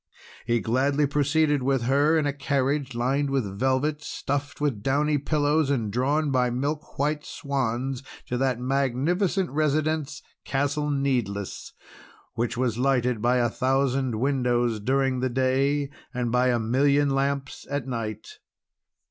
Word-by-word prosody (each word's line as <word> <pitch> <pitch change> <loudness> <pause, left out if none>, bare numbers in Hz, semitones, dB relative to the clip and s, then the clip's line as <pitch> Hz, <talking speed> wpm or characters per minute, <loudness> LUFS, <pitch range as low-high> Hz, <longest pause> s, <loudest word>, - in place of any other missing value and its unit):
He 120 -1 +2
gladly 135 +7 +1
proceeded 145 +1 +2
with 135 -1 +1
her 145 +6 +3
in 155 - +1
a 145 - 0
carriage 140 -1 -1
lined 135 +4 0
with 135 -4 0
velvet, 135 +4 +1
stuffed 145 +1 -3
with 140 -8 -1
downy 145 +4 +1
pillows, 145 +1 +1
and 115 -7 -1
drawn 145 +5 +1
by 125 -2 +2
milk 145 +5 -3
white 150 +1 0
swans, 135 -2 -2 0.2
to 125 - -3
that 130 -2 +1
magnificent 140 +9 0
residence, 155 0 0 0.2
Castle 145 +2 -1
Needless, 125 -9 -2 0.6
which 120 +1 -2
was 120 -2 0
lighted 125 -3 +1
by 120 +2 +3
a 120 -1 +2
thousand 130 -1 +1
windows 120 -4 +1
during 130 +3 +1
the 130 +1 0
day 135 +3 +1 0.2
and 120 -2 -1
by 125 +1 +3
a 125 -1 +3
million 140 +5 +2
lamps 135 0 -2
at 140 -2 -2
night. 115 -4 -5
135 Hz, 140 wpm, -25 LUFS, 125-145 Hz, 0.6 s, her